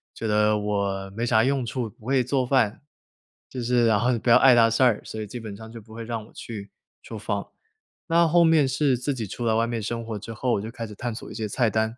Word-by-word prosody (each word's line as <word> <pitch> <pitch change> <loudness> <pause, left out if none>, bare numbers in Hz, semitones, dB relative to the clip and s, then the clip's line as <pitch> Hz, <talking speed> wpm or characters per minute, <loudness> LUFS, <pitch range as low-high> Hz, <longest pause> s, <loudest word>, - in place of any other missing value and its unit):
觉 - - -6
得 105 0 +3
我 100 -2 -2
没 115 +1 -2
啥 110 -2 +4
用 135 +1 +1
处， 120 -1 -4
不 110 - -16
会 135 -1 +2
做 130 +1 0
饭， 125 -3 +1 0.7
就 130 - -5
是 120 0 +2
然 110 -3 +3
后 125 +4 +2
你 120 - +1
不 115 +1 +1
要 - - +9
碍 130 -2 +6
她 115 -1 +6
事 115 +3 0
儿， 120 -5 +4
所 110 - -6
以 105 - -5
基 120 +5 -7
本 110 -3 -7
上 110 +2 -11
就 115 - -9
不 110 0 -15
会 115 0 -7
让 115 -2 -5
我 - - -20
去 100 -3 -8 0.3
厨 110 - -8
房。 100 -1 -3 0.6
那 170 0 +4
后 170 +2 +4
面 160 -4 +4
是 135 -1 +1
自 135 +2 -2
己 115 - -4
出 120 +5 -5
来 110 - +2
外 115 +1 +2
面 115 -2 -3
生 115 +2 -4
活 110 -2 -5
之 110 +3 -8
后， 120 +3 -1
我 - - 0
就 110 - -6
开 115 -1 -6
始 105 - -9
探 120 +3 -4
索 - - -8
一 - - -7
些 110 -2 -3
菜 115 +3 +1
单， 110 +2 -1
115 Hz, 295 characters per minute, -25 LUFS, 110-125 Hz, 0.7 s, 要